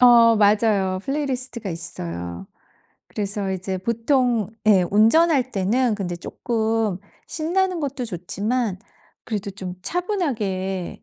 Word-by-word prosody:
어 235 -2 +7
맞아요. 205 -3 +3
플레이리스트가 255 -6 -2
있어요. 85 - -5 0.6
그래서 200 -1 -3
이제 190 0 -3
보통 235 +1 +1 0.2
예 200 -4 +6
운전할 260 - +4
때는 220 +5 +1
근데 180 -4 -3
쪼끔 220 0 -1 0.3
신나는 360 +2 0
것도 275 -3 -3
좋지만 200 +3 -2 0.5
그래도 205 -3 -3
좀 190 -2 -6
차분하게 215 - -2
220 Hz, 255 characters per minute, -23 LUFS, 190-255 Hz, 0.6 s, 어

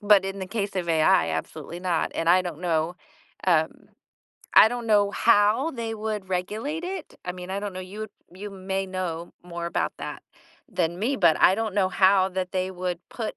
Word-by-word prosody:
but 205 -2 +5
in 195 +1 -4
the 190 - -4
case 200 0 -3
of 180 -2 -2
AI, 165 - +4
absolutely 150 - -5
not, 180 -3 0
and 165 +1 +2
I 185 +1 +6
don't 175 -3 -6
know 170 0 0 0.5
um, 160 -3 +1 0.7
I - - +10
don't 240 0 -4
know 205 -1 +4
how 220 +8 +4
they 230 -5 -4
would 215 -3 -4
regulate 215 - -2
it. 370 -1 -6
I 180 - -3
mean, 180 0 -8
I 195 +1 -2
don't 205 -2 -4
know, 185 - -6
you 205 +4 -7 0.3
you 205 +2 -7
may 195 0 -3
know 180 -3 -4
more 170 -1 -5
about 170 - -1
that - - -6 0.5
than 175 -4 -1
me, 235 +8 0
but 170 -7 +4
I 185 - +7
don't 220 -1 -2
know 190 -2 +3
how 190 0 +4
that 185 -1 -3
they 185 0 -2
would 180 -1 -3
put 225 -3 -5
190 Hz, 200 wpm, -25 LUFS, 180-210 Hz, 0.7 s, I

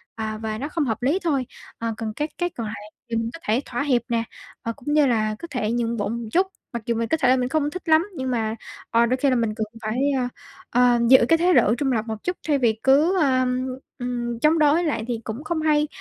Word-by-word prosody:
à, 220 -1 -4
và 215 0 -4
nó 275 - -3
không 320 -1 -1
hợp 225 -2 -2
lý 285 +9 +2
thôi. 280 -6 +1 0.3
Ờ, 230 0 -2
còn 220 -1 -4
các 300 +6 -2
cái 350 0 0
còn 230 -9 -5
lại 210 - -5 0.3
thì 230 - -2
mình 225 0 -1
có 330 - -8
thể 225 +5 +1
thỏa 245 +3 -2
hiệp 255 -4 +2
nè, 230 -1 +1 0.4
và 230 - -2
cũng 275 +5 -4
như 300 -1 +5
là 215 -3 +1
có 340 - -7
thể 225 -5 -1
nhượng 235 0 -1
bộ 205 - -1
một 235 0 -4
chút. 370 +7 +3 0.3
Mặc 235 -1 -4
dù 235 - 0
mình 230 0 -1
có 320 - +1
thể 280 -5 +2
là 255 - +6
mình 250 0 -1
không 295 +1 +1
thích 360 +1 -7
lắm 320 +4 +5
nhưng 260 -3 -2
mà, 225 -2 -1 0.4
ờ, 230 +1 +4
đôi 250 +2 +1
khi 275 +2 +2
là 255 - +2
mình 225 -3 0
cần 220 - -2 0.2
phải, 215 +2 -2 0.2
ơ, 250 - 0 0.4
ờ, 245 0 +4
giữ 260 -2 +7
cái 330 - +6
thái 355 +2 +3
độ 225 - +4
trung 270 +2 0
lập 225 -3 0
một 220 -1 -5
chút 360 0 -2
thay 295 -2 +3
vì 230 -4 +1
cứ, 300 +8 +4
ờm, 255 -2 +1 0.3
ừm, 240 -2 -3
chống 310 +5 +3
đối 305 +3 +4
lại 285 -9 -1
thì 240 -2 -2
cũng 225 +7 -6
không 315 0 -2
hay, 300 -1 +2
250 Hz, 265 wpm, -23 LUFS, 230-295 Hz, 0.4 s, giữ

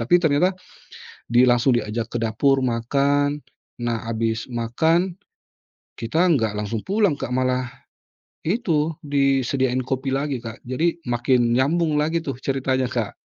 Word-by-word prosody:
Tapi 120 +10 +4
ternyata 175 +2 +2 0.7
di 120 +1 +4
langsung 125 0 +4
diajak 115 0 -2
ke - - +1
dapur 135 +5 +2
makan, 140 +4 +1 0.4
nah 120 -1 -1
abis 115 0 -2
makan 160 +10 0 0.8
kita 115 +7 -4 0.2
nggak 110 -6 0
langsung 105 +1 -3
pulang 200 -3 +1
Kak 140 - -5
malah, 130 0 0 0.7
itu, 165 -5 0 0.2
disediain 135 -2 +1
kopi 130 +1 -2
lagi 135 -2 -2
Kak. 115 -1 -7
Jadi 165 +7 0
makin 120 0 +2
nyambung 155 +5 +2
lagi 160 +3 +1
tuh 145 -5 -4
ceritanya, 130 -2 0
Kak. 120 -5 -2
130 Hz, 130 wpm, -22 LUFS, 120-150 Hz, 0.8 s, Tapi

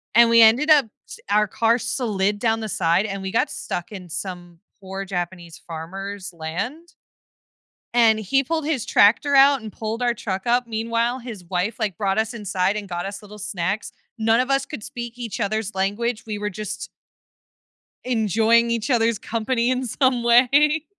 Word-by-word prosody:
and 235 0 +7
we 230 0 +6
ended 235 +8 +5
up 285 -5 +6 0.2
s - - -10
our 210 0 +3
car 230 +4 +2
slid 210 -5 -1
down 225 -1 +1
the 220 - -4
side, 175 +2 +1
and 195 -2 -4
we 190 0 -4
got - - +1
stuck 175 +4 -5
in 180 -3 -9
some 175 0 -7 0.2
poor 195 +1 -6
Japanese 175 -3 -5
farmer's 190 +4 -7
land 200 - -5 1.0
and 225 -2 +5
he 270 +6 +1
pulled 315 +3 -2
his 280 -8 -1
tractor 255 +8 +4
out 275 -2 +6
and 215 - -8
pulled 225 +2 -4
our 240 -1 +2
truck 200 -1 -4
up. 245 0 +2
Meanwhile, 230 +2 -1
his 225 -7 -9
wife, 180 +6 -2
like, 210 -6 -2
brought 195 +1 0
us 220 +2 0
inside 195 -2 -1
and 205 -2 -5
got 175 +1 -4
us 200 0 -7
little 210 0 -12
snacks. 200 0 -3 0.3
None 225 +2 +3
of 255 - -1
us 275 0 +1
could 260 -9 -7
speak 235 +1 -7
each 240 -3 -5
other's 215 -1 -2
language, 215 +4 -1
we 215 - -4
were 210 0 -3
just 210 +2 -6 1.2
enjoying 230 0 +2
each 235 +3 -1
other's 230 -3 +2
company 235 +2 -1
in 255 0 -1
some 255 0 +1
way. 280 +6 +4
220 Hz, 175 wpm, -22 LUFS, 195-240 Hz, 1.2 s, and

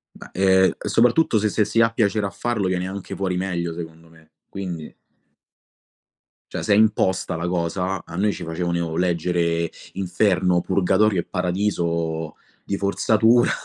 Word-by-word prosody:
Bah, - - -12
ehm, 95 0 +4
e - - -5
soprattutto 120 +2 +3
se 105 +1 +1
se 105 +1 +1
si 115 - 0
ha 115 0 +4
piacere 110 -2 +1
a - - -4
farlo 105 +1 -2
viene 90 0 -1
anche 95 0 -6
fuori 95 -2 -1
meglio, 85 -2 -2
secondo 80 0 -9
me, 80 -1 -22 0.2
quindi. 90 -5 -6 1.6
Cioè - - -4
se 105 - +2
è - - +4
imposta 100 -5 +2
la 85 +2 -3
cosa, 90 +1 -2
a 85 - -9
noi 105 +3 +1
ci - - -7
facevano 85 0 -2
leggere 85 -1 0 0.2
inferno, 90 -2 +1
purgatorio 95 +2 +2
e - - -8
paradiso 85 -4 -2 0.3
di 100 - -2
forzatura. 110 +4 +3
90 Hz, 155 wpm, -22 LUFS, 85-100 Hz, 1.6 s, ehm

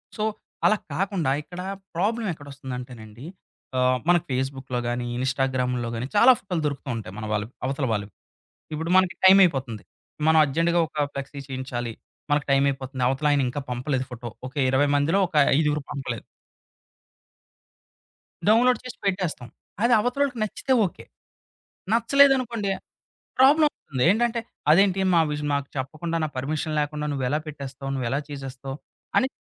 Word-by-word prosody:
So 215 - -2 0.4
అలా 215 - +5 0.2
కాకుండా 175 -5 0
ఇక్కడ 175 +4 -8 0.3
ప్రాబ్లమ్ 215 +4 0
ఎక్కడొస్తుందంటేనండి. 125 -5 -9 0.5
ఆహ్, 125 0 +3
మన 175 - +7
ఫేస్‌బుక్‌లో 130 -1 -2
గాని, 120 0 -2
ఇన్స్‌టాగ్రాముల్లో 130 -2 0
గాని, 120 +3 -3
చాలా 240 +5 +8
ఫోటో‌లు 180 -4 -3
దొరుకుతూ 140 -1 -5
ఉంటాయి 105 -4 -7
మనవాళ్ళకు, 110 +1 -3
అవతల 135 +1 -1
వాళ్ళవి. 105 -1 -3 0.6
ఇప్పుడు 160 +3 -3
మనకి 185 0 +3
టైం 190 +1 +9
అయిపోతుంది. 130 - -1 0.5
మనం 160 - +6
అర్జెంట్‌గా 165 +4 +1
ఒక 150 -1 -1
ఫ్లెక్సీ 140 +1 -6
చేయించాలి. 130 -3 -4 0.4
మనకు 145 0 +2
టైం 135 0 +4
అయిపోతుంది. 130 -1 -4
అవతలాయన 145 +1 +2
ఇంకా 135 +4 -3
పంపలేదు 130 +2 -1
ఫోటో. 120 0 -6 0.2
ఒక 130 - -17 0.2
20 135 +2 +3
మందిలో 160 +7 +2
ఒక 175 - -25 0.3
ఐదుగురివి 150 -2 0
పంపలేదు. 120 -6 -4 2.3
డౌన్‌లోడ్ 245 +4 +5
చేసి 255 - -8
పెట్టేస్తాం. 180 -10 -1 0.3
అది 240 0 +4
అవతలోళ్ళకి 250 +2 0
నచ్చితే 260 +5 -1
ఓకే. 180 - -7 0.9
నచ్చలేదనుకోండి 240 -4 +3 0.7
ప్రాబ్లమ్ 295 +4 +6
అవుతుంది 130 -4 -2
ఏంటంటే, 235 +3 +1 0.3
"అదేంటి 195 +3 +5
మా 170 - +6
విజ్ 150 0 -3
మాకు 140 -1 -1
చెప్పకుండా, 155 +6 -3
నా - - -1
పర్మిషన్ 155 +3 -2
లేకుండా 150 0 -2
నువ్వెలా 140 +2 0
పెట్టేస్తావు? 135 -2 -7
నువ్వెలా 130 +2 -1
చేసేస్తావు?" 135 -1 -6 0.4
అని 260 - +2
145 Hz, 135 wpm, -25 LUFS, 130-185 Hz, 2.3 s, టైం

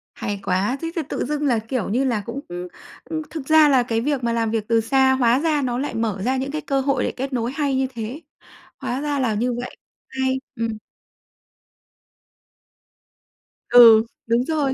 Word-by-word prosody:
Hay 205 -1 -4
quá! 195 +8 0
Thế 330 0 -3
thì 335 - 0
tự - - -2
dưng 295 +2 -2
là, 240 -4 +2
kiểu 225 0 -3
như 245 +6 +1
là 240 -6 0
cũng, 235 +4 -5 0.7
ưm, 320 -1 -2
thực 310 -4 -6
ra 310 -1 +6
là 260 -3 +4
cái 230 -2 -1
việc 280 0 -1
mà 235 0 0
làm 225 -1 0
việc 220 -2 -2
từ 230 -1 +3
xa 265 +3 +3
hóa 250 -1 +3
ra 305 -1 +1
nó 245 -2 -1
lại 280 +3 -3
mở 215 -4 -2
ra 260 +2 +1
những 270 +1 -3
cái 310 +1 -3
cơ 275 -2 -1
hội 270 -1 0
để - - -1
kết 265 +1 -5
nối 240 -1 -1
hay 280 -1 -1
như 265 0 +1
thế. 235 +6 -6 0.6
Hóa 255 +3 -3
ra 290 -1 -1
là 245 -4 +1
như 240 +4 0
vậy. 250 - -7 0.3
Hay! 265 0 -1 0.2
Ừm. 225 -1 -3 2.9
Ừ, 230 -2 +8 0.2
đúng 235 +2 +2
rồi. 295 -4 0
255 Hz, 195 wpm, -22 LUFS, 230-275 Hz, 2.9 s, Ừ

